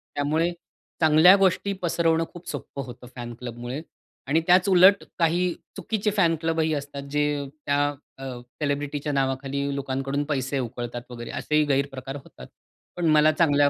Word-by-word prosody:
त्यामुळे 155 Hz, +4 st, +1 dB, 0.5 s
चांगल्या 160 Hz, +4 st, +7 dB
गोष्टी 195 Hz, +1 st, +2 dB
पसरवणं 165 Hz, -1 st, +2 dB
खूप 175 Hz, 0 st, -12 dB
सोपं 140 Hz, -, -5 dB
होतं 125 Hz, 0 st, -11 dB
फॅन 120 Hz, -1 st, -6 dB
क्लबमुळे 120 Hz, +3 st, -6 dB, 0.5 s
आणि 155 Hz, +4 st, +3 dB
त्याच 180 Hz, +2 st, +5 dB
उलट 190 Hz, +2 st, +6 dB, 0.2 s
काही 175 Hz, +2 st, +2 dB, 0.2 s
चुकीचे 210 Hz, +2 st, -1 dB
फॅन 170 Hz, -4 st, +4 dB
क्लब 165 Hz, 0 st, 0 dB
ही 160 Hz, 0 st, +2 dB
असतात, 145 Hz, -1 st, -4 dB
जे 145 Hz, -1 st, 0 dB, 0.2 s
त्या 145 Hz, 0 st, +2 dB, 0.3 s
अ, 135 Hz, -, -10 dB, 0.4 s
सेलिब्रिटीच्या 145 Hz, 0 st, -1 dB
नावाखाली 135 Hz, +1 st, -1 dB
लोकांकडून 135 Hz, +1 st, -2 dB
पैसे 135 Hz, -1 st, -1 dB
उकळतात 120 Hz, 0 st, -4 dB
वगैरे, 120 Hz, -1 st, -7 dB
असेही 155 Hz, 0 st, +1 dB
गैरप्रकार 135 Hz, -1 st, -1 dB
होतात. -, -, -13 dB, 0.5 s
पण 175 Hz, -, -2 dB
मला 155 Hz, +1 st, +6 dB
चांगल्या 145 Hz, -3 st, +3 dB
145 Hz, 145 wpm, -25 LUFS, 135-165 Hz, 0.5 s, चांगल्या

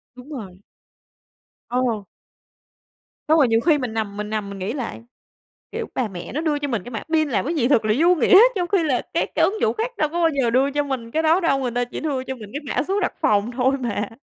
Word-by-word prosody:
Đúng 250 Hz, +4 st, -13 dB
rồi. 195 Hz, -9 st, -8 dB, 1.1 s
Ờ. 240 Hz, -4 st, 0 dB, 1.3 s
Xong 320 Hz, -, +6 dB
rồi 275 Hz, -5 st, +5 dB
nhiều 225 Hz, 0 st, +3 dB
khi 310 Hz, 0 st, +3 dB
mình 250 Hz, -5 st, -4 dB
nằm 210 Hz, -2 st, -3 dB
mình 210 Hz, 0 st, -4 dB
nằm 210 Hz, -2 st, -3 dB
mình 200 Hz, -1 st, -8 dB
nghĩ 200 Hz, +6 st, -3 dB
lại, 245 Hz, -4 st, -5 dB, 0.7 s
kiểu, -, -, -3 dB
bà 245 Hz, -4 st, -1 dB
mẹ 180 Hz, -3 st, -8 dB
nó 300 Hz, -, -2 dB
đưa 305 Hz, -3 st, 0 dB
cho 290 Hz, -1 st, -3 dB
mình 230 Hz, -7 st, -2 dB
cái 245 Hz, -, -8 dB
mã 225 Hz, -, -5 dB
pin 310 Hz, -2 st, +3 dB
làm 250 Hz, -, 0 dB
cái 330 Hz, +5 st, -2 dB
gì 255 Hz, -5 st, +1 dB
thật 230 Hz, -6 st, +3 dB
là 215 Hz, 0 st, +2 dB
vô 345 Hz, +3 st, +5 dB
nghĩa, 375 Hz, +3 st, +6 dB, 0.2 s
trong 350 Hz, -1 st, -1 dB
khi 390 Hz, -4 st, +2 dB
là 260 Hz, -5 st, +1 dB
các -, -, +1 dB
cái -, -, +3 dB
ứng 425 Hz, +2 st, 0 dB
dụng -, -, +2 dB
khác 460 Hz, +3 st, -2 dB
đâu 305 Hz, -, +1 dB
có 340 Hz, +3 st, -3 dB
bao 330 Hz, -1 st, +4 dB
giờ 235 Hz, -, +2 dB
đưa 265 Hz, +4 st, +2 dB
cho 290 Hz, +1 st, 0 dB
mình 250 Hz, -5 st, -4 dB
cái 320 Hz, +4 st, 0 dB
đó 325 Hz, +4 st, +4 dB
đâu, 275 Hz, -6 st, +2 dB
người 255 Hz, -2 st, -2 dB
ta 245 Hz, +1 st, 0 dB
chỉ 245 Hz, -, -7 dB
đưa 275 Hz, -5 st, -2 dB
cho 265 Hz, -, -4 dB
mình 215 Hz, -5 st, -11 dB
cái 290 Hz, -2 st, -5 dB
mã 250 Hz, -, +3 dB
số 395 Hz, +1 st, +1 dB
đặt 365 Hz, -, 0 dB
phòng 210 Hz, +2 st, +2 dB
thôi 260 Hz, +2 st, +2 dB
mà. 210 Hz, -4 st, -2 dB
255 Hz, 260 wpm, -22 LUFS, 225-310 Hz, 1.3 s, Xong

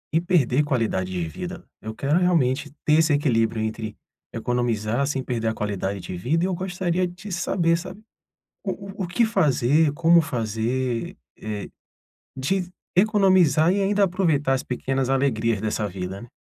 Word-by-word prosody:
e 165 Hz, -, +4 dB
perder 150 Hz, -7 st, +2 dB
qualidade 115 Hz, -10 st, -1 dB
de 90 Hz, -3 st, -2 dB
vida. 80 Hz, -, -7 dB, 0.2 s
Eu 110 Hz, 0 st, -6 dB
quero 145 Hz, +8 st, +1 dB
realmente 145 Hz, -6 st, +1 dB
ter 155 Hz, +1 st, +5 dB
esse 160 Hz, -1 st, +3 dB
equilíbrio 115 Hz, -6 st, +1 dB
entre 110 Hz, 0 st, -4 dB, 0.3 s
economizar 120 Hz, +1 st, -1 dB
sem 135 Hz, -2 st, -2 dB
perder 115 Hz, -3 st, -2 dB
a 110 Hz, -, 0 dB
qualidade 100 Hz, -1 st, -2 dB
de 90 Hz, 0 st, -6 dB
vida, 145 Hz, -, 0 dB
e -, -, +2 dB
eu 190 Hz, -, -1 dB
gostaria 180 Hz, 0 st, -1 dB
de 180 Hz, +3 st, -10 dB
saber, 170 Hz, -1 st, +1 dB
sabe? 185 Hz, +3 st, -9 dB, 0.7 s
O 195 Hz, +1 st, -5 dB
o -, -, +1 dB
o -, -, -3 dB
que 230 Hz, +7 st, +2 dB
fazer, 155 Hz, -, +3 dB
como 170 Hz, +3 st, +5 dB
fazer, 120 Hz, -2 st, -2 dB, 0.2 s
eh, 105 Hz, -1 st, -5 dB, 0.7 s
de 180 Hz, +8 st, -1 dB, 0.3 s
economizar 185 Hz, -5 st, +4 dB
e 200 Hz, -, +1 dB
ainda 200 Hz, +1 st, +3 dB
aproveitar 165 Hz, -7 st, +1 dB
as 130 Hz, -, -1 dB
pequenas 130 Hz, +1 st, -2 dB
alegrias 115 Hz, -6 st, +1 dB
dessa 110 Hz, -1 st, -1 dB
vida, 95 Hz, +1 st, -6 dB
né? 120 Hz, -, -12 dB
135 Hz, 160 wpm, -24 LUFS, 115-175 Hz, 0.7 s, ter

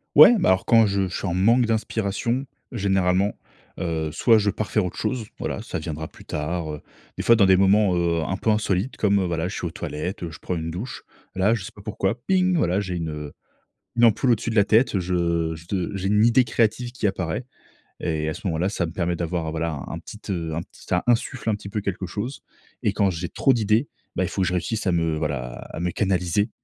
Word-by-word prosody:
Ouais, 155 Hz, +12 st, +10 dB
bah, -, -, +3 dB
alors, 95 Hz, +1 st, +3 dB
quand 115 Hz, -2 st, +6 dB
je 100 Hz, -1 st, 0 dB
je 90 Hz, -, -6 dB
suis 100 Hz, -, -3 dB
en 90 Hz, -, -1 dB
manque 115 Hz, +6 st, +4 dB
d'inspiration, 115 Hz, +3 st, -1 dB, 0.3 s
généralement, 95 Hz, -2 st, +1 dB, 0.4 s
heu, 80 Hz, -3 st, -1 dB
soit 115 Hz, +4 st, +4 dB
je 100 Hz, 0 st, +1 dB
pars 105 Hz, +1 st, -3 dB
faire 105 Hz, -, +2 dB
autre 90 Hz, -, -5 dB
chose, 120 Hz, -5 st, -2 dB
voilà, -, -, -3 dB
ça -, -, -5 dB
viendra 80 Hz, 0 st, -5 dB
plus -, -, -16 dB
tard, 80 Hz, +1 st, -3 dB
heu, 75 Hz, -, -7 dB, 0.4 s
des -, -, -2 dB
fois, 115 Hz, -, +6 dB
dans 100 Hz, -3 st, +5 dB
des 95 Hz, 0 st, +6 dB
moments, 100 Hz, -1 st, +4 dB
heu, 85 Hz, -1 st, +1 dB
un 95 Hz, -, -2 dB
peu 110 Hz, -, -1 dB
insolites 105 Hz, +1 st, 0 dB
comme, 100 Hz, -2 st, +3 dB
voilà, 85 Hz, -1 st, -1 dB
je 95 Hz, -, -5 dB
suis 90 Hz, -, -3 dB
aux -, -, -6 dB
toilettes, 85 Hz, +4 st, -4 dB
je 75 Hz, -, -11 dB
prends 90 Hz, -, -3 dB
une 80 Hz, 0 st, -3 dB
douche. 105 Hz, +9 st, -6 dB, 0.3 s
Là, 100 Hz, +4 st, +3 dB
je 110 Hz, -6 st, -2 dB
sais -, -, -7 dB
pas 100 Hz, -, -12 dB
pourquoi, 105 Hz, -1 st, -1 dB
ping, 185 Hz, -2 st, +3 dB
voilà, 90 Hz, -, +2 dB
j'ai 95 Hz, -3 st, -3 dB
une, 80 Hz, -2 st, -3 dB
heu, 75 Hz, -1 st, -6 dB, 0.6 s
une 120 Hz, -, +6 dB
ampoule 120 Hz, +3 st, +4 dB
au-dessus 115 Hz, +1 st, 0 dB
de -, -, -3 dB
la 100 Hz, -, +6 dB
tête, 110 Hz, -1 st, +3 dB
je 85 Hz, -2 st, 0 dB, 0.2 s
je 95 Hz, -4 st, -1 dB
j'ai 95 Hz, 0 st, -2 dB
une 105 Hz, +1 st, +4 dB
idée 120 Hz, +2 st, +5 dB
créative 115 Hz, +2 st, 0 dB
qui 115 Hz, -5 st, 0 dB
apparaît. 95 Hz, +3 st, -2 dB, 0.6 s
Et 80 Hz, -1 st, -1 dB
à 80 Hz, -, -2 dB
ce -, -, -8 dB
moment-là, 85 Hz, +2 st, 0 dB
ça 95 Hz, -4 st, -1 dB
me 80 Hz, -, -4 dB
permet 85 Hz, -1 st, -1 dB
d'avoir, 85 Hz, -1 st, -2 dB
voilà, 80 Hz, -3 st, -3 dB
un 85 Hz, -, -5 dB
petit, 105 Hz, +6 st, -11 dB
heu, 85 Hz, -4 st, -2 dB
un 85 Hz, -, -1 dB
petit -, -, -14 dB
ça 90 Hz, -, 0 dB
insuffle 120 Hz, 0 st, 0 dB
un 105 Hz, -, +3 dB
petit 100 Hz, -1 st, -7 dB
peu 105 Hz, -1 st, -2 dB
quelque 95 Hz, -1 st, -3 dB
chose, 110 Hz, +9 st, -5 dB, 0.4 s
et -, -, +2 dB
quand 100 Hz, -, +2 dB
j'ai 85 Hz, -1 st, -3 dB
trop 135 Hz, -3 st, +3 dB
d'idées, 110 Hz, +4 st, +2 dB, 0.3 s
bah, 90 Hz, -, 0 dB
il -, -, -1 dB
faut 95 Hz, -, -2 dB
que -, -, +2 dB
je -, -, -2 dB
réussisse 105 Hz, +4 st, -2 dB
à 90 Hz, -, +3 dB
me, 80 Hz, -2 st, +1 dB
voilà, 70 Hz, -6 st, -2 dB, 0.2 s
à -, -, -6 dB
me 90 Hz, 0 st, 0 dB
canaliser. 95 Hz, +1 st, 0 dB
95 Hz, 235 wpm, -24 LUFS, 85-110 Hz, 0.6 s, Ouais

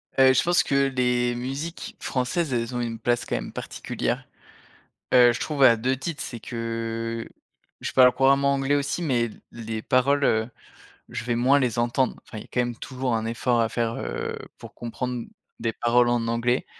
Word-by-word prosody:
Heu, 130 Hz, 0 st, +6 dB
je -, -, +3 dB
pense 175 Hz, 0 st, +3 dB
que 140 Hz, 0 st, +2 dB
les 125 Hz, -1 st, +1 dB
musiques 135 Hz, +8 st, -5 dB
françaises, 130 Hz, +3 st, -1 dB
elles 120 Hz, +1 st, -2 dB
ont 120 Hz, -, -1 dB
une 115 Hz, -1 st, -4 dB
place 120 Hz, +1 st, 0 dB
quand -, -, -2 dB
même -, -, -4 dB
particulière. -, -, -4 dB, 0.9 s
Heu, 120 Hz, -1 st, +7 dB
je -, -, -5 dB
trouve 145 Hz, -3 st, -1 dB
à 115 Hz, -2 st, +7 dB
2 130 Hz, +4 st, 0 dB
titres, 155 Hz, +3 st, -5 dB
c'est 120 Hz, -3 st, -7 dB
que 115 Hz, 0 st, -4 dB, 0.5 s
je -, -, -4 dB
parle 125 Hz, -1 st, +7 dB
couramment 140 Hz, +1 st, +3 dB
anglais 135 Hz, +1 st, +1 dB
aussi 145 Hz, +5 st, -2 dB
mais, 125 Hz, -7 st, +1 dB
l 115 Hz, -, -8 dB
les 110 Hz, -1 st, -5 dB
paroles, 140 Hz, +2 st, +2 dB
heu, 110 Hz, +1 st, +2 dB, 0.6 s
je 115 Hz, 0 st, -5 dB
vais 120 Hz, -1 st, -1 dB
moins 130 Hz, +4 st, +4 dB
les 120 Hz, -3 st, 0 dB
entendre. 120 Hz, +2 st, +1 dB
Enfin, 110 Hz, -, -10 dB
il -, -, -6 dB
y -, -, -9 dB
a, -, -, -18 dB
quand 125 Hz, -, 0 dB
même, 120 Hz, -1 st, 0 dB
toujours, 130 Hz, 0 st, -3 dB
un 110 Hz, -, -2 dB
effort 115 Hz, +1 st, 0 dB
à 115 Hz, -, +1 dB
faire, 115 Hz, -1 st, -1 dB
heu, -, -, -4 dB, 0.2 s
pour -, -, -11 dB
comprendre 120 Hz, 0 st, -4 dB, 0.3 s
des 115 Hz, -1 st, -1 dB
paroles 120 Hz, 0 st, +3 dB
en 120 Hz, -1 st, +1 dB
anglais, 120 Hz, +2 st, 0 dB
120 Hz, 195 wpm, -25 LUFS, 115-135 Hz, 0.9 s, Heu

